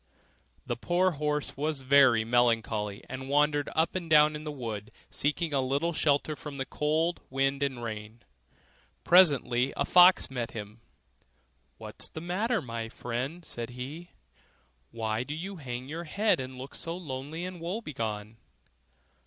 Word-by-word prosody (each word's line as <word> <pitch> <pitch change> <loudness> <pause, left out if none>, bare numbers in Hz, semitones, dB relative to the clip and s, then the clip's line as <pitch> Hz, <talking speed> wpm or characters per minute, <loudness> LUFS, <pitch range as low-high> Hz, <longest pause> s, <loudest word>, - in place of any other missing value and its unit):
The - - -2
poor 180 +2 +2
horse 150 -1 -2
was 150 0 -2
very 130 -4 +5
melancholy, 115 -4 +1
and 130 +1 -6
wandered 145 0 +2
up 160 +1 +2
and 175 -3 -4
down 150 0 +6
in 150 +1 -7
the 150 - -3
wood, 110 -6 -5 0.2
seeking 150 +3 0
some 135 -2 +1
little 145 +6 0
shelter 150 0 +1
from 145 -1 -8
the 135 - -2
cold 160 +5 0
wind 135 +1 0
and 135 -4 -1
rain. 110 +1 -7 0.8
Presently 140 -8 +5
a 140 - +1
fox 180 -3 +6
met 120 -3 -3
him: 105 +1 -8 1.0
'What's - - -4
the - - -7
matter, 190 +5 -1
my 115 -2 -5
friend?' 130 +9 -4
said 120 -1 -6
he, 135 +8 -7 0.8
'why 110 -1 -2
do 150 +4 -5
you 190 +4 -6
hang 125 -5 -5
down 130 - -12
your 165 +3 -4
head 205 +5 +2
and 130 0 -6
look 130 +3 -8
so 165 +1 -5
lonely 150 +1 -5
and 180 -2 -7
woe 180 +6 -2
begone? 110 - -5
140 Hz, 155 wpm, -29 LUFS, 120-160 Hz, 1.0 s, down